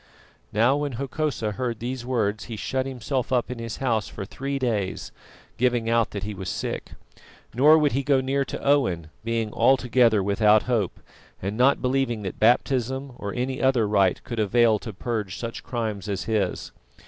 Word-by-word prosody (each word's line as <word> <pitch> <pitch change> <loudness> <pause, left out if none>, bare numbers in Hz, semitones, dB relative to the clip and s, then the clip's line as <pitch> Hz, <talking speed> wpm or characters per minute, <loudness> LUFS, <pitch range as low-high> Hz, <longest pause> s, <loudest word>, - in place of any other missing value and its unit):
Now, 120 +6 +3
when 145 -2 -2
Hokosa 135 -3 -2
heard 120 +2 -3
these 125 +1 -4
words 110 -4 -1
he 115 - -6
shut 130 +5 -2
himself 130 0 -3
up 125 -1 +1
in 125 - -5
his 115 -1 -5
house 115 -5 0
for 100 - -7
three 140 +7 -4
days, 110 -8 -2 0.5
giving 120 -2 +1
out 115 -1 +3
that 100 -2 -6
he 105 +1 -4
was 95 -2 -5
sick. - - -4 0.6
Nor 150 +7 +6
would 150 -2 +3
he 135 - 0
go 135 0 +3
near 135 +1 0
to - - -5
Owen, 95 - +1
being 115 -2 -2
altogether 125 -5 +3
without 105 +2 +4
hope, 115 -7 -1 0.4
and 100 +3 -3
not 130 +4 +3
believing 125 -4 0
that 95 - -5
baptism 130 +3 +2
or 100 - -4
any 130 +2 -2
other 130 -5 +3
rite 100 -3 +2
could 120 -2 -5
avail 110 +1 +3
to 110 - -7
purge 105 -2 -3
such 115 -1 -5
crimes 110 -4 -4
as 95 -3 -2
his. 100 -2 -1
115 Hz, 175 wpm, -25 LUFS, 105-130 Hz, 0.6 s, Nor